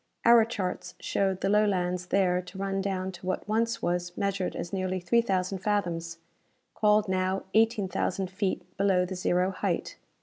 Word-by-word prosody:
Our 235 -1 +7
charts 200 -6 -4
showed 190 -2 0
the 195 - +1
Lowlands 180 -4 +1
there 180 -2 +2
to 185 +1 -12
run 195 0 -1
down 190 -1 -2
to 180 0 -12
what 185 - -2
once 230 +2 0
was 175 0 -1
measured 195 -2 -1
as 170 +2 -5
nearly 185 -1 -1
three 185 +7 +3
thousand 190 -3 -1
fathoms 175 -5 -1 0.6
called 210 0 +3
now 185 0 0
eighteen 220 -2 +3
thousand 185 +1 -2
feet 190 -1 -1
below 190 -2 +3
the 185 - -5
zero 180 0 +1
height. 185 - -2
190 Hz, 165 wpm, -28 LUFS, 180-200 Hz, 0.6 s, Our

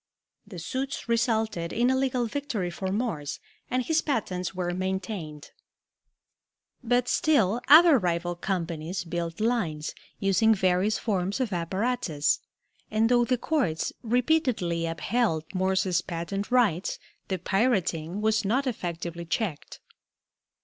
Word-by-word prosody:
The 195 -3 -9
suits 260 +13 -4
resulted 220 -7 0
in 245 +2 +2
a - - +2
legal 260 -2 +1
victory 225 -8 -3
for 190 +2 -4
Morse, 190 - -2 0.3
and 255 0 0
his 320 +4 +2
patents 190 - -2
were 175 -1 -2
maintained. 185 -4 -4 1.3
But 245 +1 +2
still 240 -9 +2
other 315 -1 +8
rival 175 -2 -1
companies 170 -1 -3
built 170 0 -4
lines, 200 -10 -1 0.3
using 210 +3 +3
various 190 +2 +2
forms 195 0 -1
of 240 -6 -1
apparatus, 180 -3 0 0.5
and 220 +1 +2
though 240 -1 +4
the 255 +1 +1
courts 235 - -1
repeatedly 240 - +1
upheld 165 0 0
Morse's 185 -1 +1
patent 175 +4 -4
rights, 225 -9 +2 0.3
the 190 - -1
pirating 190 -3 0
was 220 0 +2
not 250 +8 +1
effectively 170 -7 -4
checked. 170 -3 -3
195 Hz, 120 wpm, -27 LUFS, 170-240 Hz, 1.3 s, other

